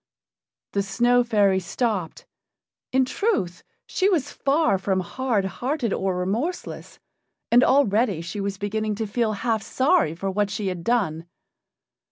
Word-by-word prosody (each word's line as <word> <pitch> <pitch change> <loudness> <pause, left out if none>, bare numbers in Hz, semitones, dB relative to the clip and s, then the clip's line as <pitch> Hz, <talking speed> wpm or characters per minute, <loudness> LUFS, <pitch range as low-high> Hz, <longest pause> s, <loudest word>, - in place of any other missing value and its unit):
The 200 - 0
Snow 240 +6 +2
fairy 205 -5 +3
stopped; 190 -2 -2 0.7
in 260 0 +3
truth, 250 - -1 0.2
she 385 +1 +1
was 305 -7 0
far 275 - +1
from 190 0 0
hard 225 +1 -1
hearted 245 - -2
or 190 -1 -1
remorseless, 225 - -3 0.5
and 245 +2 +6
already 230 - +3
she 170 +5 -5
was 195 0 -3
beginning 215 +1 -2
to 220 +2 -2
feel 215 +1 0
half 220 +1 -1
sorry 260 - +2
for 195 +3 -3
what 205 +1 0
she 205 -1 -2
had 180 -2 -5
done. 175 -8 0
210 Hz, 140 wpm, -24 LUFS, 190-245 Hz, 0.7 s, and